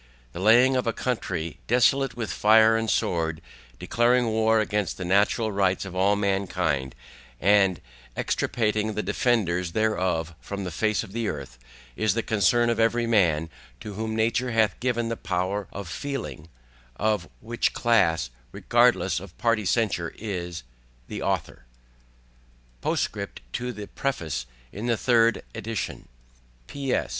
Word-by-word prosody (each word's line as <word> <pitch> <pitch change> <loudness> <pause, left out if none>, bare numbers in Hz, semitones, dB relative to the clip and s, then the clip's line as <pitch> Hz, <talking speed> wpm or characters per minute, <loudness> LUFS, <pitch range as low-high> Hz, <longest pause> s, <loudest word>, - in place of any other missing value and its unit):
The 85 - -8
laying 120 +6 +5
of 125 -2 0
a 115 - +1
Country 90 -10 -3
desolate 125 +1 +3
with 115 -2 -3
Fire 110 +1 +5
and 115 0 0
Sword, 80 -5 0 0.4
declaring 120 - +2
War 110 0 +2
against 105 -2 -1
the 90 - -5
natural 105 +4 +2
rights 95 -1 +1
of 95 -1 -8
all 95 +2 +3
Mankind, 90 -9 -1 0.4
and 95 -2 +4 0.4
extirpating 110 -2 0
the 105 - -1
Defenders 90 -5 0
thereof 90 -6 0
from 100 -1 -6
the 90 - -4
Face 105 +4 0
of 105 - -11
the 115 +1 -2
Earth, 70 -7 -6 0.4
is 110 -2 +1
the 115 - 0
Concern 120 +3 +3
of 115 - -2
every 115 +1 +2
Man 85 -9 +2 0.3
to 105 - -7
whom 110 +2 -3
Nature 115 +3 +1
hath 110 -3 +1
given 120 -2 0
the 115 - -1
Power 95 +1 -2
of 100 -2 -7
feeling; 85 - -5 0.5
of 105 0 0
which 120 +2 -1
Class, 85 - +2 0.2
regardless - - +2
of 95 -1 -12
Party 115 -3 +1
Censure, 105 -8 0
is 90 - -5 0.5
THE - - -5
AUTHOR - - -2 1.2
POSTSCRIPT - - -2
TO 125 0 -2 0.2
PREFACE 80 - -3 0.2
IN 105 +4 -5
THE 115 -2 +2
THIRD 115 -1 +3
EDITION 115 0 -5 0.6
P. 140 -2 -4
S. - - 0
105 Hz, 140 wpm, -25 LUFS, 90-115 Hz, 1.2 s, laying